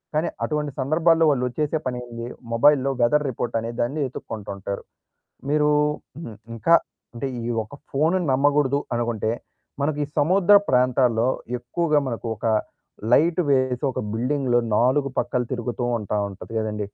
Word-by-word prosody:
కానీ 165 +2 +1
అటువంటి 150 -2 -1
సందర్భాల్లో 160 +4 +3
వాళ్ళు 125 -2 0
చేసే 150 +1 +1
పనేంది? 120 -1 -5 0.3
మొబైల్‌లో 135 +2 +4
వెదర్ 150 +5 +3
రిపోర్ట్ 120 -1 -4
అనే 115 +1 -4
దాన్ని 135 +6 -1
వెతుక్కుంటూ 110 -5 -7
ఉంటారు. 100 +1 -5 0.7
మీరు 150 0 +3 0.6
హ్మ్. 110 -3 -9 0.2
ఇంకా 165 +9 +4 0.4
అంటే 135 +4 -3 0.2
ఈ - - -4 0.2
ఒక్క 125 +7 -12 0.2
ఫోన్‌ను 160 +6 +2
నమ్మగూడదు 140 0 +2 0.2
అనుకుంటే 115 -2 -1 0.5
మనకి 150 +1 0
ఈ - - -15
సముద్ర 185 +6 +5
ప్రాంతాల్లో 125 -2 +3 0.3
ఎక్కువగా 150 +5 0
మనకు 115 -1 -4
ఒక 105 - -8 0.7
లైట్ 165 +6 +4
వేసి 130 -1 +1
ఒక - - -4
బిల్డింగ్‌లో 125 0 +1 0.2
నాలుగు 135 +4 +2
పక్కల 125 +1 0
తిరుగుతూ 120 0 -3
ఉంటా 105 0 -2
ఉంటది 100 +3 -10
కదండీ. 105 -1 -3
130 Hz, 140 wpm, -23 LUFS, 120-150 Hz, 0.7 s, సముద్ర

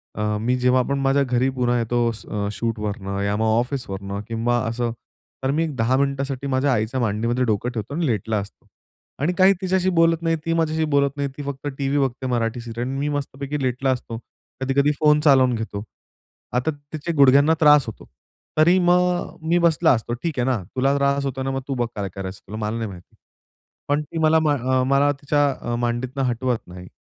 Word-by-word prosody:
अ, 105 0 -1
मी 125 +3 +1
जेव्हा 125 +1 +3
आपण 140 +2 -1
माझ्या 135 +1 +2
घरी 125 0 +1
पुन्हा 125 -1 +1
येतो 120 +1 +1
अ, - - -1
स - - -11 0.3
शूटवरनं 105 -3 -3
या 100 +1 0
मग 110 - 0
ऑफिसवरनं 100 -6 -4
किंवा 115 +1 0
असं. 120 0 -2 0.5
तर 135 - +1
मी 160 +3 +1
एक 155 -4 -4
10 120 +2 +1
मिनिटांसाठी 140 0 -1
माझ्या 135 +1 +1
आईच्या 115 +4 -1
मांडीमध्ये 115 +3 0
डोकं 110 +2 0
ठेवतो. 110 +4 -5
आणि 170 -1 0
लेटला 110 -1 -1
असतो. 100 - -10 0.6
आणि 175 +5 +1
काही 190 +1 +6
तिच्याशी 185 0 +1
बोलत 165 -1 +3
नाही, 165 -1 +1
ती 165 - +1
माझ्याशी 160 -1 +1
बोलत 140 -1 +3
नाही, 140 -1 -1
ती 145 - -5
फक्त 140 0 -5
टीव्ही 140 +1 0
बघते 130 -1 -1
मराठी 120 -1 -1
सीरियल, 120 +1 -5
मी 140 +2 -2
मस्तपैकी 140 0 -4
लेटला 130 +1 0
असतो. 120 -2 -4 0.4
कधी-कधी 140 +2 +2
फोन 150 -1 +5
चालवून 130 -4 +5
घेतो. 110 -2 -5 0.7
आता 125 +6 +1
त्याचे 145 +3 -6
गुडघ्यांना 140 +3 +6
त्रास 150 -2 +6
होतो. 110 - -8 0.5
तरी 170 +4 +5
मग 180 0 +1
मी 175 - +4
बसला 160 0 +3
असतो, 120 0 -2
ठीक 160 -6 -2
आहे 120 - +1
ना, 125 - +2 0.2
तुला 135 +2 +2
त्रास 140 0 +1
होतोय 130 0 -3
ना 135 - -2
मग 135 - -2
तू 140 - -2
बघ 120 - -2
काय 100 -2 -3
करायचं 95 0 -6
तुला? 110 - -6
मला 105 +2 -2
नाही 115 -2 -3
माहिती. 90 -2 -13 0.7
पण 145 +1 +1
ती 165 - -8
मला 160 +1 +5
अ, 130 -4 +1
मला 140 +2 +3
तिच्या 145 0 +2 0.2
अ, 120 0 -2
मांडीतनं 120 +3 -2
हटवत 120 0 -1
नाही, 90 +1 -10
130 Hz, 195 wpm, -22 LUFS, 115-145 Hz, 0.7 s, काही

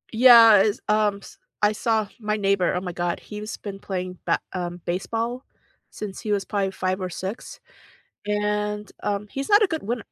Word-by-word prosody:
Yeah, 230 -3 +9
is, 215 +5 +1
ums 210 -1 0 0.2
I 210 - +5
saw 215 -1 0
my 210 0 -1
neighbor, 195 -3 +2
oh 180 - -1
my 180 -2 -4
god, 175 0 -2
he's 210 +1 -7
been 195 -1 -7
playing 185 -2 -5
ba - - +3 0.2
um, 175 -1 -4
baseball 230 +7 -2 0.5
since 205 -3 -7
he 210 - -3
was 200 -1 0
probably 200 -2 -1
5 185 0 -2
or 185 - -3
6, 190 +5 -6 0.7
and, 210 0 -1
um, 205 0 -2
he's 275 +5 -5
not 410 +1 +6
a - - +4
good 320 -2 -4
winner, 230 +3 -3
210 Hz, 180 wpm, -24 LUFS, 190-220 Hz, 0.7 s, Yeah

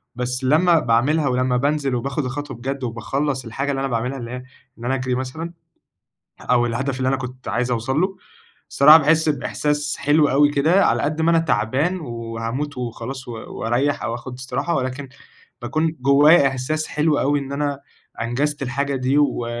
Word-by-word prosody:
بس 125 +1 -3
لمّا 165 +5 +4
باعملها، 140 +5 +2
ولمّا 125 -1 +1
بانزل، 140 0 0
وباخد 135 +4 -2
الخطوة 135 0 -5
بجد، 135 +3 -4
وباخلّص 130 +3 -2
الحاجة 135 +5 -3
اللي 135 - -2
أنا 135 - -1
باعملها، 125 +2 -2
اللي 120 -2 -7
هي 125 0 -6 0.4
إن 120 - -8
أنا 130 +2 +1
أجري 130 -1 -1
مثلًا، 160 +7 -5 0.9
أو 120 -1 +2
الهدف 130 +3 -2
اللي 130 0 0
أنا 135 - +1
كنت 130 -1 -8
عايز 120 +4 -1
أوصل 125 +5 0
له، 190 +1 0 0.5
الصراحة 150 +3 +8
باحس 160 +1 +2
بإحساس 145 0 -1
حلو 145 +1 +3
أوي 145 +2 +4
كده. 155 +7 +3
على - - +1
قد 155 +2 -1
ما 165 - +3
أنا 165 - +4
تعبان، 150 - 0
وهاموت 115 +2 -5
وخلاص، 125 +2 -6
و - - -5
وأريح 120 +4 -2
أو 115 - -2
آخد 120 +2 -7
استراحة، 140 +6 -2
ولكن 130 +1 -3 0.5
باكون 155 +6 -1
جوَّايا 140 +3 +6
إحساس 135 +4 -2
حلو 150 -1 +1
أوي 145 +1 +2
إن 140 0 -7
أنا 140 -1 -2 0.4
أنجزت 140 +5 -1
الحاجة 140 +2 -1
دي، 130 +3 +1
و 140 -5 +1
135 Hz, 175 wpm, -21 LUFS, 125-150 Hz, 0.9 s, الصراحة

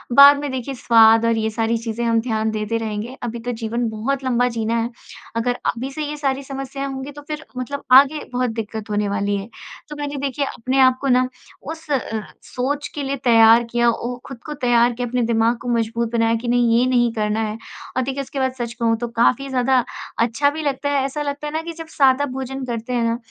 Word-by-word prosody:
बाद 280 +1 +9
में 290 0 -3
देखिए 260 +1 -4
स्वाद 225 -1 +5
और 230 -1 +2
ये 220 0 0
सारी 225 +1 0
चीज़ें 230 +1 -4
हम 230 -1 +3
ध्यान 220 -2 -1
देते 215 +1 -2
रहेंगे 220 +2 -4
अभी 235 0 -4
तो 245 - -1
जीवन 235 +1 -1
बहुत 260 +5 -2
लंबा 245 -1 +2
जीना 225 +1 0
है, 230 +1 -1 0.5
अगर 245 +2 0
अभी 255 +3 -2
से 305 +2 -4
ये 300 +1 -5
सारी 275 -1 -1
समस्याएँ 270 0 -5
होंगी 270 +1 -6
तो 290 +1 -11
फिर 305 0 -5
मतलब 275 +3 -4 0.2
आगे 290 +2 +1
बहुत 250 -1 0
दिक्कत 220 -1 -5
होने 205 0 0
वाली 200 0 0
है। 195 - -6 0.4
तो 300 - -6
मैंने 290 0 -3
देखिए 280 0 -1
अपने 260 +2 -2
आप 260 -1 +5
को 275 - -1
ना 255 0 +4 0.4
उस 320 -1 -10
अ, 275 - +3 0.4
सोच 280 +3 -3
के 290 - -3
लिए 275 +1 -1
तैयार 230 -1 +6
किया 240 0 +3
ओ, 240 +1 -3
खुद 270 -4 -9
को 300 - -5
तैयार 245 -3 +3
किया 245 +1 -3
अपने 245 +1 -1
दिमाग 230 +1 +2
को 245 - -4
मजबूत 230 +1 -1
बनाया 230 0 +2
कि - - -4
नहीं 240 -1 +3
ये 250 - +3
नहीं 240 -2 +3
करना 215 0 -1
है। 215 - -5 0.4
और 260 - +3
देखिए 270 +2 -3
उसके 270 +1 -6
बाद 260 -1 0
सच 235 -1 -3
कहूँ 230 -2 +1
तो 240 +1 -3
काफ़ी 275 +3 +2
ज़्यादा 255 -1 +2 0.4
अच्छा 285 +5 +2
भी 310 +1 -5
लगता 285 0 -1
है। 280 -2 +1
ऐसा 295 +2 -3
लगता 285 +1 -3
है 295 - -6
ना 315 - -1
कि 335 0 -6
जब 325 0 -9
सादा 270 0 +4
भोजन 265 0 -4
करते 235 0 -4
हैं 240 - +1
ना 230 0 0
245 Hz, 230 wpm, -21 LUFS, 230-275 Hz, 0.5 s, बाद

